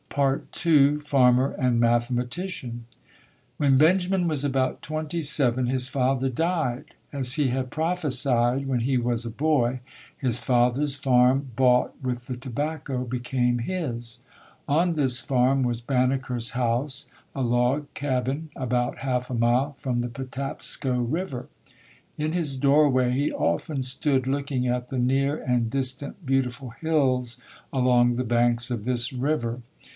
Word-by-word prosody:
II 140 Hz, +1 st, +3 dB
FARMER 135 Hz, -3 st, +3 dB
AND 125 Hz, -2 st, 0 dB
MATHEMATICIAN 120 Hz, +2 st, -1 dB, 0.7 s
When 140 Hz, -2 st, +3 dB
Benjamin 180 Hz, +4 st, +3 dB
was 150 Hz, -4 st, 0 dB
about 135 Hz, -2 st, 0 dB
twenty 155 Hz, +2 st, -3 dB
seven, 130 Hz, -4 st, +1 dB
his 130 Hz, 0 st, 0 dB
father 135 Hz, 0 st, 0 dB
died. 150 Hz, -1 st, -2 dB, 0.2 s
As 130 Hz, -3 st, +2 dB
he 150 Hz, -2 st, +1 dB
had 130 Hz, +1 st, -2 dB
prophesied 135 Hz, -6 st, 0 dB
when 130 Hz, -3 st, 0 dB
he 130 Hz, +2 st, +1 dB
was 120 Hz, -1 st, -1 dB
a -, -, -3 dB
boy, 130 Hz, -1 st, +1 dB, 0.4 s
his 125 Hz, -3 st, +1 dB
father's 125 Hz, +4 st, +1 dB
farm 130 Hz, -1 st, +3 dB
bought 125 Hz, 0 st, +3 dB
with 125 Hz, -2 st, -3 dB
the 125 Hz, -, -4 dB
tobacco, 135 Hz, +1 st, -4 dB
became 125 Hz, 0 st, -1 dB
his. 120 Hz, -6 st, -4 dB, 0.4 s
On 165 Hz, +4 st, +2 dB
this 130 Hz, -5 st, +2 dB
farm 130 Hz, +1 st, +2 dB
was 120 Hz, -2 st, -1 dB
Banneker's 125 Hz, -1 st, 0 dB
house 125 Hz, +3 st, -1 dB, 0.3 s
a 135 Hz, -, -2 dB
log 125 Hz, +4 st, +1 dB
cabin 140 Hz, +3 st, -2 dB
about 125 Hz, -1 st, -1 dB
half 125 Hz, -2 st, -2 dB
a -, -, -4 dB
mile 120 Hz, +5 st, +2 dB
from 125 Hz, -2 st, -1 dB
the 120 Hz, -, -3 dB
Patapsco 130 Hz, 0 st, -4 dB
River. 130 Hz, 0 st, -3 dB, 0.7 s
In 155 Hz, +1 st, -1 dB
his 155 Hz, -6 st, -1 dB
doorway 135 Hz, -2 st, +3 dB
he 140 Hz, +3 st, 0 dB
often 150 Hz, -5 st, -1 dB
stood 130 Hz, 0 st, 0 dB
looking 140 Hz, -2 st, -1 dB
at 125 Hz, 0 st, -2 dB
the 130 Hz, -, -2 dB
near 135 Hz, +4 st, +1 dB
and 120 Hz, -4 st, 0 dB
distant 135 Hz, -, -3 dB
beautiful 130 Hz, -1 st, -1 dB
hills 130 Hz, -5 st, 0 dB, 0.3 s
along 125 Hz, -2 st, +3 dB
the 125 Hz, -, -1 dB
banks 120 Hz, +1 st, +1 dB
of 115 Hz, -4 st, -3 dB
this 120 Hz, +1 st, -2 dB
river. 125 Hz, -3 st, -1 dB
130 Hz, 135 wpm, -25 LUFS, 125-140 Hz, 0.7 s, II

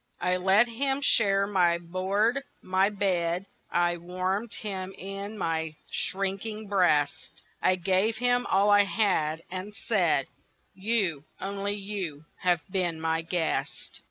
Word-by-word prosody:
I 180 Hz, 0 st, +1 dB
let 195 Hz, +5 st, +4 dB
him 270 Hz, +4 st, 0 dB
share 200 Hz, -8 st, +3 dB
my 180 Hz, -4 st, +3 dB
board, 190 Hz, +9 st, 0 dB, 0.2 s
my 190 Hz, +2 st, +2 dB
bed, 185 Hz, -3 st, 0 dB, 0.2 s
I 175 Hz, 0 st, +1 dB
warmed 185 Hz, +6 st, -2 dB
him 190 Hz, -3 st, -5 dB
in 195 Hz, +2 st, -6 dB
my 160 Hz, -3 st, -2 dB, 0.2 s
shrinking 200 Hz, +3 st, -2 dB
breast, 160 Hz, -6 st, +1 dB, 0.2 s
I 185 Hz, -, +4 dB
gave 190 Hz, +5 st, +1 dB
him 245 Hz, +1 st, +2 dB
all 200 Hz, +2 st, +3 dB
I 205 Hz, 0 st, +6 dB
had, 165 Hz, -7 st, 0 dB
and 190 Hz, +3 st, -6 dB
said: 175 Hz, -, +1 dB, 0.5 s
"You, 190 Hz, -7 st, 0 dB
only 200 Hz, +1 st, -2 dB
you, 195 Hz, -7 st, -5 dB
have 175 Hz, -2 st, +2 dB
been 175 Hz, -4 st, 0 dB
my 160 Hz, 0 st, 0 dB
guest. 165 Hz, -1 st, -3 dB
190 Hz, 130 wpm, -28 LUFS, 175-205 Hz, 0.5 s, I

